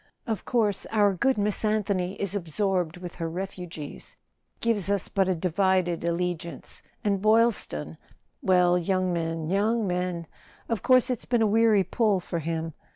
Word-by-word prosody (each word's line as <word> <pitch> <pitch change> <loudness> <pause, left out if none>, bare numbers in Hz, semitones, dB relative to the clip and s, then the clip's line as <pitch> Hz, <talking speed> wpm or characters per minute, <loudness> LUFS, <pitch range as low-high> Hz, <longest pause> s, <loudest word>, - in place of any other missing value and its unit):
Of 220 -6 -3
course 220 -5 0
our 205 -2 +3
good 265 +8 +1
Miss 205 +1 0
Anthony 200 -3 0
is 200 -1 -1
absorbed 180 -2 -1
with 175 -1 -8
her 165 -1 -3
refugees—gives 185 +4 -5
us 200 -2 0
but 195 -2 +1
a 185 - +1
divided 180 0 +1
allegiance. 170 0 -3 0.2
And 200 -2 +1
Boyl¬ 225 +2 +5
ston—well, 175 - -1
young 185 0 0
men, 165 -1 -2
young 210 +5 +1
men! 180 -2 -2 0.4
Of 225 -5 -2
course 255 0 +4
it's 245 - -3
been 240 -2 +2
a - - +4
weary 215 -1 +4
pull 205 +1 +1
for 170 -1 -4
him. 160 0 -3
190 Hz, 150 wpm, -26 LUFS, 175-210 Hz, 0.4 s, Boyl¬